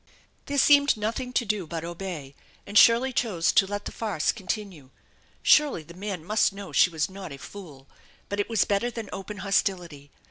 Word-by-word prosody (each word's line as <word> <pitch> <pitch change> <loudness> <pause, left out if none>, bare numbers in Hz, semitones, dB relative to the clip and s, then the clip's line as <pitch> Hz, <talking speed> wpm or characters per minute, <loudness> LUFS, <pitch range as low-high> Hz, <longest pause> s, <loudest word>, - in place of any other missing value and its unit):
There 285 - -2
seemed 285 -1 +5
nothing 230 +4 -3
to 240 - +1
do 205 -5 -2
but 165 0 -5
obey, 170 -5 -6 0.3
and 205 - -10
Shirley 235 +4 +6
chose 180 -10 +1
to 195 - +4
let 205 +1 -5
the - - -5
farce 205 -9 -1
continue. 190 - -6 0.5
Surely 290 - +4
the 170 - -13
man 185 -3 -6
must 210 0 +2
know 195 -1 -9
she - - +5
was 160 -3 -1
not 190 -3 -9
a 140 - -8
fool, 145 -5 -11 0.4
but 200 - -4
it 205 - -1
was 225 -2 +2
better 205 +4 0
than 230 -3 -7
open 205 +2 -7
hostility. 175 -7 -1
200 Hz, 185 wpm, -26 LUFS, 170-220 Hz, 0.5 s, Shirley